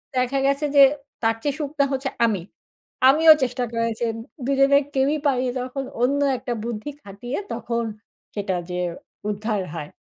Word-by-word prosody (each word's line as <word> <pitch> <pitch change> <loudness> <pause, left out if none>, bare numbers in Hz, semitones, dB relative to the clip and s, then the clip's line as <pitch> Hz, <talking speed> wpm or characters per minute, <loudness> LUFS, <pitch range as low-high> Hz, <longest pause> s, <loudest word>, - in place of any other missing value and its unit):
দেখা 255 +2 +1
গেছে 280 +2 +1
যে, 280 - +9 0.4
তার 225 -1 +2
চেয়ে 285 -2 0
শুকনা 290 -1 0
হচ্ছে 270 0 -1 0.2
আমি। 210 -6 0 0.7
আমিও 315 +3 +8
চেষ্টা 250 0 -1
করেছি। 230 0 -1 0.4
২ 275 +1 +1
জনের 280 +1 +5
কেউই 275 +3 +2
পারি, 260 -2 +1
তখন 255 +2 -4 0.2
অন্য 280 +3 +2 0.2
একটা 245 0 -4
বুদ্ধি 230 +3 -4
খাটিয়ে, 205 +7 -6 0.2
তখন 235 0 -2 0.5
সেটা 200 -3 -2
যেয়ে 180 0 -1 0.4
উদ্ধার 210 0 -1
হয়। 150 -3 -6
250 Hz, 150 wpm, -23 LUFS, 225-275 Hz, 0.7 s, যে